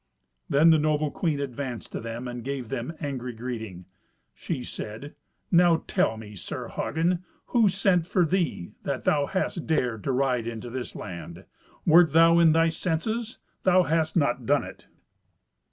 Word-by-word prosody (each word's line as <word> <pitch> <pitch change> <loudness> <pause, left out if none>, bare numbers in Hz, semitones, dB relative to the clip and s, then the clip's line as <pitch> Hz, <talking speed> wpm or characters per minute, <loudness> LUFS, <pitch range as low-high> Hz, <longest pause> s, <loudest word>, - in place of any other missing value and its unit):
Then 155 +4 +6
the 160 - +5
noble 150 -1 +1
queen 155 -3 -1
advanced 130 -3 -5
to - - -4
them 115 +2 -6
and 120 -1 -6
gave 135 -3 -4
them 120 +7 -3
angry 130 -5 -4
greeting. 110 -6 -6 0.5
She 135 -7 -4
said, 115 +5 -7 0.4
"Now 170 -2 +5
tell 110 - +1
me, 105 -1 -10
Sir 95 - -6
Hagen, 170 +3 -1 0.3
who 230 -4 +5
sent 185 -3 +2
for 180 -2 +2
thee, 165 - -1
that 140 -2 -3
thou 145 -2 +2
hast 185 -3 -2
dared 125 -9 0
to 135 - +1
ride 125 -3 0
into 115 +1 -6
this 130 0 -5
land? 85 -4 -8 0.4
Wert 165 -2 +6
thou 165 +1 +6
in 165 -2 +6
thy 165 +1 +4
senses, 215 +8 -2 0.2
thou 185 0 +4
hadst 160 0 0
not 125 -6 +1
done 145 +1 +3
it." - - -11
145 Hz, 160 wpm, -26 LUFS, 120-165 Hz, 0.5 s, Then